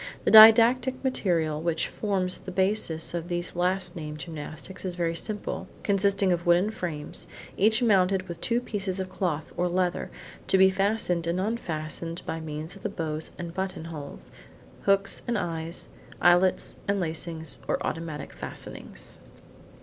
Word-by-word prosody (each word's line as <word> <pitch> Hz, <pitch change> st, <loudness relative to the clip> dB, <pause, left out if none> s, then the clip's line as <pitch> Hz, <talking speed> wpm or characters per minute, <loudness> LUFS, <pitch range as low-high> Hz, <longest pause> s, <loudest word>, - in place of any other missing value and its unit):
The -, -, +2 dB
didactic 235 Hz, +4 st, +8 dB
material 165 Hz, -, 0 dB
which 165 Hz, -1 st, 0 dB
forms 190 Hz, -4 st, -1 dB
the -, -, -9 dB
basis 185 Hz, -4 st, 0 dB
of 170 Hz, -1 st, -3 dB
these 175 Hz, 0 st, -3 dB
last 180 Hz, 0 st, 0 dB
named 150 Hz, -2 st, -6 dB
gymnastics 155 Hz, +4 st, -7 dB
is 185 Hz, -2 st, -3 dB
very 170 Hz, -1 st, 0 dB
simple, 210 Hz, +4 st, -3 dB, 0.2 s
consisting 200 Hz, -1 st, +2 dB
of 175 Hz, -1 st, 0 dB
wooden 175 Hz, +5 st, +4 dB
frames, 155 Hz, -8 st, -5 dB, 0.3 s
each 220 Hz, +4 st, +3 dB
mounted 190 Hz, -3 st, +3 dB
with 170 Hz, -2 st, -7 dB
two 240 Hz, 0 st, +1 dB
pieces 195 Hz, -5 st, -3 dB
of 185 Hz, -1 st, -4 dB
cloth, 160 Hz, -5 st, -2 dB
or 180 Hz, -, +1 dB
leather, 180 Hz, 0 st, 0 dB, 0.4 s
to -, -, +4 dB
be 190 Hz, 0 st, +6 dB
fastened 190 Hz, -3 st, 0 dB
and 170 Hz, +2 st, 0 dB
unfastened 170 Hz, -5 st, -3 dB
by 165 Hz, -, -3 dB
means 155 Hz, +2 st, -6 dB
of 195 Hz, -, -13 dB
the -, -, -2 dB
buttons 155 Hz, -1 st, -3 dB
and 170 Hz, -1 st, -6 dB
buttonholes, 165 Hz, -6 st, -6 dB, 0.6 s
books 195 Hz, 0 st, +2 dB
and 235 Hz, -1 st, +1 dB
eyes, 165 Hz, -3 st, -4 dB, 0.3 s
eyelets 175 Hz, +1 st, +3 dB
and 200 Hz, 0 st, +1 dB
lacings, 165 Hz, -1 st, -4 dB
or -, -, +1 dB
automatic 160 Hz, -3 st, -4 dB
fastenings. -, -, -8 dB
180 Hz, 150 wpm, -27 LUFS, 165-195 Hz, 0.6 s, didactic